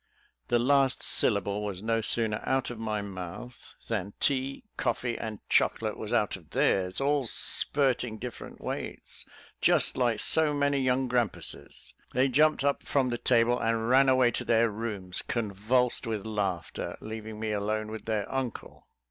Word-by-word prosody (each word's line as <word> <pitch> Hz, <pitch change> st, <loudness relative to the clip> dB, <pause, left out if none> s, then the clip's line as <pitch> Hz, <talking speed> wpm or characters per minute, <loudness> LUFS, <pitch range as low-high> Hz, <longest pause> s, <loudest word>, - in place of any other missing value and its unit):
The 120 Hz, -, +3 dB
last 135 Hz, +1 st, +3 dB
syllable 100 Hz, -1 st, 0 dB
was 100 Hz, -2 st, -5 dB
no 115 Hz, 0 st, +1 dB
sooner 110 Hz, -1 st, 0 dB
out 130 Hz, -1 st, 0 dB
of 120 Hz, -, -8 dB
my 110 Hz, -2 st, -2 dB
mouth, 100 Hz, +6 st, -8 dB
than 100 Hz, -3 st, -3 dB
tea, 135 Hz, -1 st, 0 dB
coffee, 120 Hz, -1 st, -1 dB
and 110 Hz, -2 st, -7 dB
chocolate -, -, +1 dB
was -, -, -6 dB
out -, -, +1 dB
of -, -, -14 dB
theirs, 90 Hz, -1 st, +1 dB
all 140 Hz, 0 st, +1 dB
spirting 125 Hz, -1 st, +2 dB
different 125 Hz, +1 st, -8 dB
ways, -, -, -6 dB, 0.3 s
just -, -, +4 dB
like 120 Hz, -4 st, +1 dB
so 155 Hz, -2 st, +2 dB
many 145 Hz, -1 st, +1 dB
young 130 Hz, 0 st, +1 dB
grampuses. 120 Hz, -4 st, -2 dB, 0.2 s
They 130 Hz, +2 st, +3 dB
jumped 150 Hz, +2 st, +3 dB
up 140 Hz, 0 st, +1 dB
from 135 Hz, -3 st, +1 dB
the 120 Hz, -, -2 dB
table 120 Hz, 0 st, +3 dB
and 115 Hz, 0 st, 0 dB
ran 135 Hz, +1 st, +5 dB
away 130 Hz, -2 st, +4 dB
to -, -, -2 dB
their 115 Hz, -1 st, +3 dB
rooms, 100 Hz, -4 st, -2 dB
convulsed 115 Hz, +3 st, 0 dB
with 110 Hz, -3 st, -3 dB
laughter, 100 Hz, -6 st, -3 dB
leaving 110 Hz, 0 st, -7 dB
me 110 Hz, -1 st, -2 dB
alone 105 Hz, +1 st, -2 dB
with 110 Hz, -, -7 dB
their 110 Hz, -3 st, -1 dB
uncle. 130 Hz, -4 st, -5 dB
115 Hz, 155 wpm, -28 LUFS, 105-130 Hz, 0.3 s, ran